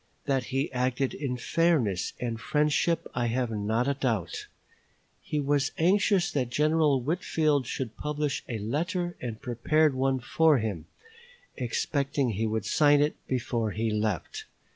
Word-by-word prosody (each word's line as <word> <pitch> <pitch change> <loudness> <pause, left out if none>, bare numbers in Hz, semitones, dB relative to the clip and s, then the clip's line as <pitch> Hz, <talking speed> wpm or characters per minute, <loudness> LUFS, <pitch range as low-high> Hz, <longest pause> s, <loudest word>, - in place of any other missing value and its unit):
That 135 -3 0
he 135 +7 -1
acted 125 +1 0
in 130 -4 -3
fairness 125 - +1
and 115 -2 -3
friendship 150 +4 +1
I 120 -1 0
have 120 0 -1
not 110 +4 0
a 140 - +2
doubt. 115 -10 -2 0.7
He 150 - -2
was 145 0 +1
anxious 195 +1 +3
that 130 -6 -1
General 150 0 +3
Whitfield 150 -1 0
should 125 -4 -4
publish 150 -1 -2
a 115 - -2
letter 175 - -2
and 115 -3 -5
prepared 150 +5 +2
one 130 0 +1
for 155 +4 +3
him, 105 -9 -3 0.7
expecting 140 +1 -1
he 110 +2 -1
would 110 -1 -2
sign 145 +6 +4
it 150 +1 +2
before 120 -3 -1
he 110 0 -1
left. 105 -4 -2
130 Hz, 140 wpm, -28 LUFS, 115-150 Hz, 0.7 s, sign